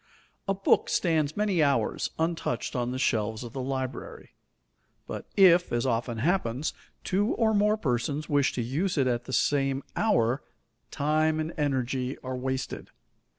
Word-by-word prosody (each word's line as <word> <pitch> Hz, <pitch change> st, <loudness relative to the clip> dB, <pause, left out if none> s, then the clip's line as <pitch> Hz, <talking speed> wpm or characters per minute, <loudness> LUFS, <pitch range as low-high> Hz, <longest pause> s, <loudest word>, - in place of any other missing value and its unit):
A 195 Hz, -, +1 dB
book 195 Hz, -, +2 dB
stands 155 Hz, -3 st, +1 dB
many 205 Hz, -5 st, +2 dB
hours 140 Hz, -2 st, +1 dB
untouched 160 Hz, -7 st, -2 dB
on 120 Hz, -1 st, 0 dB
the 130 Hz, -, -3 dB
shelves 110 Hz, -2 st, 0 dB
of 120 Hz, -, -8 dB
the 135 Hz, -, -3 dB
library; 130 Hz, 0 st, -5 dB, 0.7 s
but -, -, -7 dB
if, 180 Hz, -2 st, +6 dB
as 120 Hz, +1 st, 0 dB
often 120 Hz, -1 st, -1 dB
happens, 140 Hz, -1 st, 0 dB, 0.3 s
two 200 Hz, +3 st, +1 dB
or 220 Hz, -2 st, +2 dB
more 210 Hz, +1 st, +3 dB
persons 140 Hz, -, -1 dB
wish 145 Hz, -2 st, +2 dB
to 120 Hz, -, -2 dB
use 160 Hz, +10 st, -1 dB
it 135 Hz, -, +3 dB
at 120 Hz, -1 st, 0 dB
the 130 Hz, -, -6 dB
same 135 Hz, -1 st, +1 dB
hour, 130 Hz, -, +2 dB, 0.5 s
time 155 Hz, +2 st, +1 dB
and 155 Hz, +1 st, -3 dB
energy 130 Hz, -2 st, -1 dB
are 130 Hz, 0 st, -4 dB
wasted. 130 Hz, +1 st, -4 dB
140 Hz, 150 wpm, -28 LUFS, 125-165 Hz, 0.7 s, if